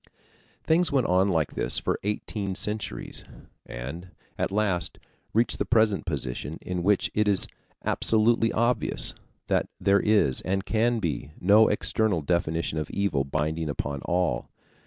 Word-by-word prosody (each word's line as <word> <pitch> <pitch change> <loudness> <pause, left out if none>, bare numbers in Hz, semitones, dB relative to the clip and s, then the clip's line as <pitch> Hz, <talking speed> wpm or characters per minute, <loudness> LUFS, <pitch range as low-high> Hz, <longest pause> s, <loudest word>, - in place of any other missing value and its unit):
Things 165 +2 +2
went 135 -4 +2
on 90 +2 +3
like 80 -5 0
this - - 0
for - - -1
eighteen 100 -1 -3
centuries, 105 +2 -3 0.4
and 70 +10 -7 0.3
at - - -2
last 100 -4 0 0.3
reached 115 +2 +1
the - - +2
present 110 -4 +2
position 70 0 -4
in 90 -1 -4
which 100 +2 +2
it 105 0 +1
is 100 -2 +6 0.4
absolutely 115 +1 +3
obvious 115 - +2 0.3
that - - 0
there 100 +2 +3
is, 100 -12 +3
and 95 +1 -2
can 115 +2 +1
be, 80 -6 -3
no 105 +4 +6
external 105 -4 0
definition 80 -1 -1
of 75 - -4
evil 85 -9 0
binding 75 +3 -2
upon 70 -1 -3
all. 85 -8 -1
95 Hz, 140 wpm, -26 LUFS, 80-110 Hz, 0.4 s, is